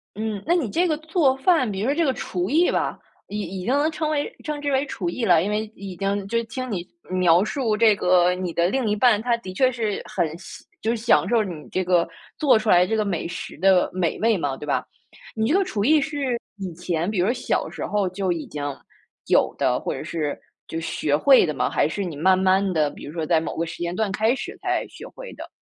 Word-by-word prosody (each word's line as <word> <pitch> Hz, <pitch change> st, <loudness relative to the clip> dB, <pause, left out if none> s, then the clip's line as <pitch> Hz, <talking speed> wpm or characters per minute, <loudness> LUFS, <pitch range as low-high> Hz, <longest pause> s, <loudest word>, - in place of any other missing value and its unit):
嗯 215 Hz, -2 st, -3 dB
那 340 Hz, -, +3 dB
你 275 Hz, -, 0 dB
这 350 Hz, -, +1 dB
个 310 Hz, -2 st, 0 dB
做 315 Hz, -4 st, +2 dB
饭 270 Hz, -, +2 dB
比 195 Hz, -1 st, -3 dB
如 225 Hz, -, 0 dB
说 285 Hz, -, +1 dB
这 335 Hz, -1 st, +2 dB
个 265 Hz, -, +2 dB
厨 180 Hz, -4 st, -3 dB
艺 330 Hz, +5 st, +3 dB
吧， -, -, -1 dB, 0.3 s
已 210 Hz, +1 st, -4 dB
已 185 Hz, 0 st, -5 dB
经 255 Hz, -, +1 dB
能 295 Hz, +3 st, +2 dB
称 310 Hz, 0 st, -2 dB
为 295 Hz, -1 st, -1 dB
称 300 Hz, -1 st, -4 dB
之 285 Hz, -1 st, -1 dB
为 270 Hz, +2 st, +2 dB
厨 180 Hz, -10 st, -3 dB
艺 230 Hz, +6 st, -2 dB
了。 175 Hz, -4 st, +5 dB
因 205 Hz, -, -1 dB
为 215 Hz, +1 st, -2 dB
已 195 Hz, -2 st, -8 dB
经 195 Hz, +2 st, -2 dB
就 230 Hz, +2 st, 0 dB
听 245 Hz, +2 st, -5 dB
你 180 Hz, -2 st, -3 dB, 0.2 s
描 180 Hz, 0 st, +4 dB
述 225 Hz, -1 st, -1 dB
这 215 Hz, -1 st, +5 dB
个， 180 Hz, -1 st, +3 dB
你 180 Hz, -2 st, -4 dB
的 170 Hz, +1 st, +2 dB
另 260 Hz, -2 st, 0 dB
一 210 Hz, -, +1 dB
半， 215 Hz, -1 st, +4 dB
她 240 Hz, 0 st, +1 dB
的 185 Hz, -5 st, -8 dB
确 255 Hz, +4 st, +3 dB
是 220 Hz, -4 st, -2 dB
很 165 Hz, -, -1 dB
享 190 Hz, -, -12 dB, 0.2 s
就 225 Hz, -, 0 dB
是 235 Hz, -, -1 dB
享 230 Hz, +2 st, +3 dB
受 230 Hz, -2 st, +3 dB
你 170 Hz, -6 st, -7 dB
这 185 Hz, -, -1 dB
个 175 Hz, -2 st, +2 dB, 0.3 s
做 280 Hz, -7 st, +4 dB
出 220 Hz, 0 st, -2 dB
来 180 Hz, 0 st, +6 dB
这 220 Hz, -, -1 dB
个 215 Hz, -, +1 dB
美 180 Hz, -5 st, -2 dB
食 170 Hz, -, -7 dB
的 190 Hz, +1 st, +4 dB
美 180 Hz, -3 st, -1 dB
味 225 Hz, -2 st, +3 dB
嘛， 145 Hz, -4 st, -2 dB
对 150 Hz, -, -8 dB
吧？ 145 Hz, -, -1 dB, 0.5 s
你 220 Hz, 0 st, 0 dB
这 355 Hz, -, +4 dB
个 395 Hz, -, +3 dB
厨 205 Hz, -, -2 dB
艺 305 Hz, +5 st, +5 dB
是 280 Hz, -5 st, -2 dB, 0.2 s
以 190 Hz, -3 st, -5 dB
前 175 Hz, +1 st, -2 dB
比 205 Hz, -4 st, -1 dB
如 195 Hz, +6 st, +3 dB
小 250 Hz, -, -1 dB
时 -, -, -5 dB
候 205 Hz, -2 st, 0 dB
就 185 Hz, 0 st, -2 dB
已 165 Hz, -2 st, -3 dB
经 145 Hz, -1 st, -6 dB, 0.6 s
有 -, -, +3 dB
的， -, -, +1 dB
或 -, -, -3 dB
者 -, -, -6 dB
是 150 Hz, -3 st, -3 dB, 0.3 s
就 165 Hz, -, -4 dB
学 150 Hz, -2 st, 0 dB
会 265 Hz, -, +6 dB
的 150 Hz, -, -1 dB
吗？ 130 Hz, -, 0 dB
还 -, -, +1 dB
是 200 Hz, +5 st, -3 dB
你 165 Hz, -4 st, -5 dB
慢 185 Hz, +5 st, +3 dB
慢 190 Hz, 0 st, +2 dB
地， 155 Hz, -2 st, +2 dB
比 -, -, -12 dB
如 145 Hz, -, -7 dB
说 165 Hz, -2 st, -2 dB
在 160 Hz, 0 st, +2 dB
某 -, -, -5 dB
个 165 Hz, -, 0 dB
时 165 Hz, -, -8 dB
间 175 Hz, 0 st, -2 dB
段 220 Hz, -1 st, 0 dB
开 220 Hz, +4 st, +2 dB
始， -, -, -6 dB
才 -, -, 0 dB
学 -, -, -11 dB
会 -, -, -10 dB
的？ -, -, -9 dB
205 Hz, 270 characters per minute, -23 LUFS, 180-250 Hz, 0.6 s, 来